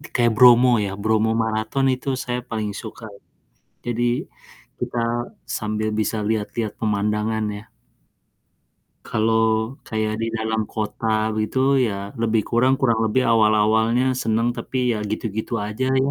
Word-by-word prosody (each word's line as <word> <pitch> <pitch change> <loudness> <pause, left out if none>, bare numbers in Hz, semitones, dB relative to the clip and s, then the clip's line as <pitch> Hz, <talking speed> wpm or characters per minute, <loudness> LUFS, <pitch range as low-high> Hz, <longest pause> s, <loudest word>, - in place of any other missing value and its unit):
kayak 120 -1 +3
Bromo 125 +1 +7 0.2
ya, 95 - -3
Bromo 110 +1 +2
Marathon 110 +4 -1
itu 130 +2 -7 0.2
saya 125 -1 -2
paling 110 -2 -2
suka. 110 +1 -9 0.8
Jadi 120 0 -2 0.8
kita 120 - -3 0.6
sambil 110 0 -2
bisa 110 +1 -1
lihat-lihat 110 0 -2
pemandangan 105 +1 0
ya. 105 - -12 1.4
Kalau 110 +1 +1 0.5
kayak 110 -1 -1
di - - 0
dalam 110 0 -1
kota 110 +1 -3 0.3
begitu 110 +4 -1 0.3
ya - - -2 0.3
lebih 110 -1 +2
kurang 130 +3 +3
kurang 115 -4 +2
lebih 110 +4 +2
awal-awalnya 110 +2 +3 0.2
seneng 115 +1 +1
tapi - - -5 0.2
ya 110 - -2
gitu-gitu 110 0 -4
aja 105 +5 -3 0.2
ya, 140 - 0
110 Hz, 125 wpm, -22 LUFS, 110-120 Hz, 1.4 s, Bromo